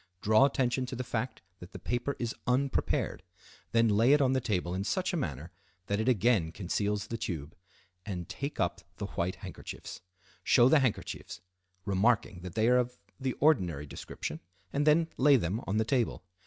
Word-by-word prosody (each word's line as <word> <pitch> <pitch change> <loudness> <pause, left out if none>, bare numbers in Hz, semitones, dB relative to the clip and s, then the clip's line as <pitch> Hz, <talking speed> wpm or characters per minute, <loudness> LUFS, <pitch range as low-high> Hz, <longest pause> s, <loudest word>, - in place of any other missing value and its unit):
Draw 110 +5 +6
attention 130 -2 0
to 130 - -5
the 125 - -3
fact 120 -1 -3 0.2
that 90 - -12
the - - -6
paper 120 +3 -2
is 120 -1 -2
unprepared, 130 +2 0 0.5
then 115 0 +4
lay 115 +6 +5
it 150 - +5
on 135 -2 +3
the 130 - +1
table 90 -7 -1
in 95 +1 -2
such 185 - -1
a - - +1
manner 80 - -3 0.3
that 100 +2 -1
it 110 +3 +1
again 110 -7 +3
conceals 100 +3 -1
the 115 +1 -5
tube, 80 -7 -4 0.5
and 90 -5 -5
take 140 +2 -5
up 90 - 0 0.2
the 105 - -3
white 90 -2 -2
handkerchiefs. - - -8 0.4
Show 120 0 +5
the 155 - +6
handkerchiefs, 130 -6 -2 0.4
remarking 100 0 +2
that 90 +1 -8
they 110 0 +3
are 125 +1 +5
of 125 0 -2 0.2
the 130 -2 -1
ordinary 90 - +2
description, 75 +2 -6 0.3
and 145 +2 +1
then 160 +2 +5
lay 140 +2 +6
them 105 -1 0
on 100 - 0
the 110 - +2
table. 120 -4 0
115 Hz, 180 wpm, -30 LUFS, 95-130 Hz, 0.5 s, Draw